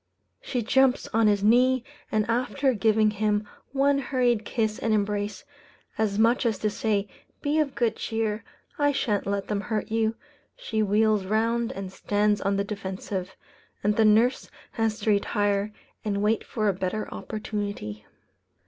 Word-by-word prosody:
She 245 -3 -2
jumps 265 +3 +3
on 225 0 +4
his 205 -1 +2
knee, 250 +3 +4 0.3
and 215 -1 +1
after 255 +3 +1
giving 215 0 +3
him 210 0 0 0.2
one 275 +1 +3
hurried 245 -5 +1
kiss 220 -3 -1
and 225 -1 +1
embrace, 205 -1 -2 0.5
as 210 -2 0
much 230 +3 +3
as 225 -4 +1
to 215 +2 -1
say, 205 -1 0 0.4
"Be 295 +2 +1
of 290 -3 0
good 235 -2 +1
cheer, 220 -1 -2 0.4
I 290 0 +3
shan't 210 -8 0
let 200 -1 -1
them 205 -1 -1
hurt 215 0 -3
you," 225 0 +1 0.4
she 240 - -2
wheels 210 -1 +2
round 230 +3 +1
and 190 -1 -6
stands 205 +1 +1
on 200 0 +1
the 200 - +1
defensive; 190 -2 -5 0.5
and 210 +1 +2
the 225 - +4
nurse 225 +4 +3 0.2
has 225 -1 -1
to 215 - +2
retire 205 0 +1 0.3
and 200 -1 -1
wait 215 +1 +2
for 215 -2 -2
a 200 - +3
better 190 +3 -3
opportunity. 205 - -5
215 Hz, 155 wpm, -26 LUFS, 205-230 Hz, 0.5 s, on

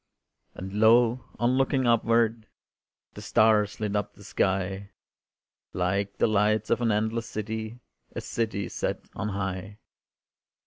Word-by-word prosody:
And 95 +1 -7
lo! 115 +2 +4
on 120 +2 +2
looking 135 0 +1
upward 115 -1 +2 0.7
The - - -9
stars 110 -2 +3
lit 105 -1 -2
up 105 0 -2
the 100 - -15
sky 95 +1 -1 0.8
Like 100 +3 -1
the - - +3
lights 110 0 +1
of 115 - +2
an 115 -2 +2
endless 110 +2 -1
city, 110 +2 -5 0.3
A - - -3
city 110 -3 -2
set - - -4
on 105 - -3
high. 100 0 -4
110 Hz, 130 wpm, -27 LUFS, 100-115 Hz, 0.8 s, lo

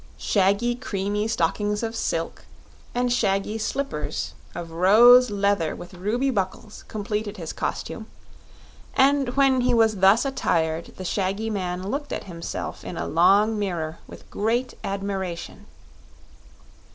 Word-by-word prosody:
Shaggy 200 +4 +2
creamy 210 -3 -2
stockings 210 +2 0
of 225 0 -3
silk, 165 -6 -3 0.5
and 245 0 +1
shaggy 195 0 0
slippers 185 - -3 0.2
of 170 -1 -6
rose 230 +9 +7
leather 200 -5 0
with 175 - -10
ruby 220 +9 0
buckles, 205 0 -4
completed 210 0 -3
his 165 -3 -6
costume, - - -4 0.9
and 270 -2 +3
when 270 -2 +4
he 245 0 +2
was 220 -2 +3
thus 195 +7 +5
attired 165 -11 0
the 185 - -6
shaggy 200 +4 -1
man 185 -3 -3
looked 285 +6 -3
at - - -3
himself 170 -3 -6
in - - -6
a - - -2
long 200 +7 +4
mirror 170 -5 -3
with - - -13
great 235 +4 0
admiration. 195 -3 -4
205 Hz, 125 wpm, -24 LUFS, 185-235 Hz, 0.9 s, rose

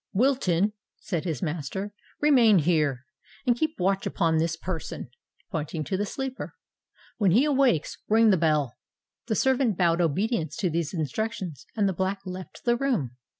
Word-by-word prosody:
"Wilton," 210 -5 +2 0.3
said 175 -3 -3
his 160 -8 -2
master, 170 +6 -3 0.3
"remain 250 -9 +6
here, 150 -6 +1 0.4
and 245 - +4
keep 315 +2 -2
watch 195 +2 +1
upon 165 -4 +1
this 165 0 0
person,"—pointing 160 -1 -6
to 190 - -2
the 205 +2 -1
sleeper. 265 +2 -5 0.6
"When 200 -4 +4
he 230 - +5
awakes, 270 - +2
ring 220 0 +5
the - - +5
bell." 150 -6 +1 0.5
The 220 - 0
servant 260 -6 +2
bowed 170 -1 +3
obedience 170 - 0
to 180 - -1
these 165 +1 -2
instructions; 170 - -3
and 205 -2 +3
the 190 - 0
Black 190 +2 -1
left 185 0 -8
the 240 -1 +4
room. 240 - 0
185 Hz, 150 wpm, -26 LUFS, 160-225 Hz, 0.6 s, remain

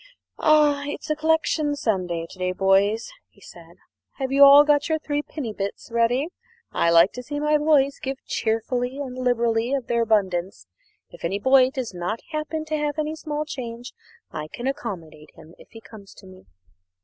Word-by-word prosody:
"A 300 -2 +4
it's 295 - -5
a - - +1
collection 310 -1 +1
Sunday 180 -10 -2
to 185 - -14
day, 185 0 -1
boys," 195 - +2 0.2
he - - -26
said. - - -15 0.4
"Have 265 -1 -4
you 280 +1 +6
all 280 +1 +9
got 295 +1 +2
your 315 - +2
threepenny 290 -5 -4
bits 200 +3 -6
ready? 240 +6 +1 0.4
I 170 - +1
like 170 +2 +6
to 250 - -6
see 290 +3 -5
my 300 0 +2
boys 285 -2 +2
give 270 0 -4
cheerfully 245 +3 -2
and 265 -3 -5
liberally 240 0 0
of 265 -3 -3
their 235 -1 0
abundance. 190 - 0 0.5
If - - -14
any 180 +4 -1
boy 260 +3 +4
does 260 -6 -5
not 180 +6 -3
happen 310 0 -3
to 310 0 -2
have 295 0 -2
any 310 0 -2
small 305 -1 -4
change, 245 -5 -7 0.4
I 155 0 -5
can 240 +10 -8
accommodate 185 - -6
him 160 - -15
if - - -16
he 225 - -12
comes 200 -1 -14
to 195 - -15
me." 185 - -16
250 Hz, 180 wpm, -23 LUFS, 200-295 Hz, 0.5 s, all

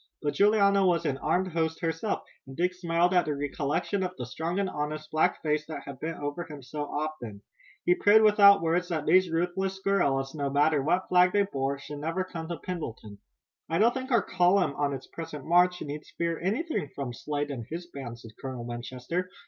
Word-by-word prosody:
But 145 - 0
Juliana 200 -1 +4
was 170 -3 +2
an 135 -3 -1
armed 185 +5 +1
host 160 -1 -1
herself, 165 +5 -1 0.2
and 135 - -10
Dick 180 +2 +1
smiled 175 0 +1
at 180 -1 +4
the 150 - -1
recollection 145 +6 -1
of 185 -1 -2
the 125 - -4
strong 160 +9 -3
and 200 -1 +1
honest 155 -1 -4
black 155 0 +1
face 150 -1 +1
that 155 -3 -6
had 140 -2 -9
bent 165 +3 -4
over 145 +3 -4
him 150 -4 -10
so 145 +4 -4
often. 145 -10 -5 0.4
He 175 - +5
prayed 210 +4 +5
without 200 -3 +7
words 175 +2 +1
that 155 -4 -2
these 185 -1 +4
ruthless 180 +3 -1
guerrillas, 140 -9 +1
no 140 -3 -2
matter 145 +1 +3
what 175 +6 +1
flag 180 0 +4
they 205 0 +4
bore, 140 -7 -2
should 145 +1 -8
never 165 +5 -1
come 165 -3 -7
to 170 0 -4
Pendleton. 115 - -6 0.5
"I 165 - +1
don't 230 +5 +4
think 260 0 -5
our 235 -5 +3
column 180 -2 +3
on 145 0 0
its 135 -2 -5
present 160 -3 -8
march 180 +2 +3
need 150 +1 -5 0.2
fear 170 -1 -1
anything 215 - -1
from 135 -4 -4
Slade 145 +3 -3
and 120 -4 -6
his 170 +2 -5
band," 135 -8 -8
said 115 -1 -12
Colonel 130 -3 -5
Winchester. 125 +9 -4
165 Hz, 205 wpm, -28 LUFS, 145-180 Hz, 0.5 s, without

